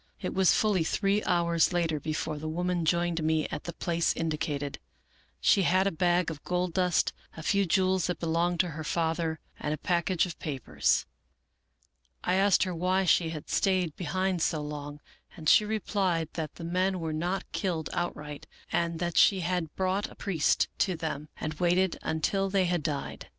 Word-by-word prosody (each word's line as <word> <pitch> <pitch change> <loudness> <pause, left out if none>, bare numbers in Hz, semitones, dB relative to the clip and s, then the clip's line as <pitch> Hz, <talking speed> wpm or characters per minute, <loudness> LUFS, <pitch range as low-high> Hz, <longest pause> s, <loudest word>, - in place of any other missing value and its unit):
" - - -41
It - - -3
was 190 -2 +4
fully 205 -6 +2
three 200 +5 +1
hours 170 -1 +2
later 165 -3 0
before 155 0 -3
the 155 +1 -4
woman 175 +1 -1
joined 170 0 +1
me 155 -1 +1
at - - -6
the 170 - -4
place 170 0 0
indicated. 150 -3 -2 0.6
She 195 - +4
had 185 +1 +3
a 200 - +2
bag 175 0 +1
of 150 - -9
gold 180 -1 -1
dust, 180 -2 +2 0.2
a 160 - -7
few 200 +2 +2
jewels 185 +1 +2
that 180 - -2
belonged 170 +1 0
to 180 - -3
her 155 0 -6
father, 160 0 -1 0.2
and 150 0 -1
a - - -12
package 175 +1 +1
of 175 - -8
papers. 135 -6 0 1.2
I 180 - +1
asked 195 +1 +4
her 185 -2 -2
why 185 +3 +1
she 170 -1 +3
had 155 -2 -7
stayed 185 -5 +1
behind 185 0 -1
so 155 -2 0
long, 145 0 -6 0.4
and 160 -2 -6
she 210 - +6
replied 195 -6 0
that 155 -3 -4
the 170 - -9
men 185 +2 0
were 160 -2 -3
not 175 +5 -2
killed 170 -5 -2
outright, 150 -4 -4 0.2
and 170 -1 0
that 175 0 -2
she 195 -2 +5
had 175 -2 -2
brought 190 +2 0
a - - -14
priest 175 -7 +1
to 185 -3 +2
them 155 -2 -4
and 155 - -3
waited 180 +1 +2
until 195 +5 0
they 190 -1 +2
had 175 -2 0
died. 145 -2 -4
170 Hz, 180 wpm, -29 LUFS, 160-185 Hz, 1.2 s, she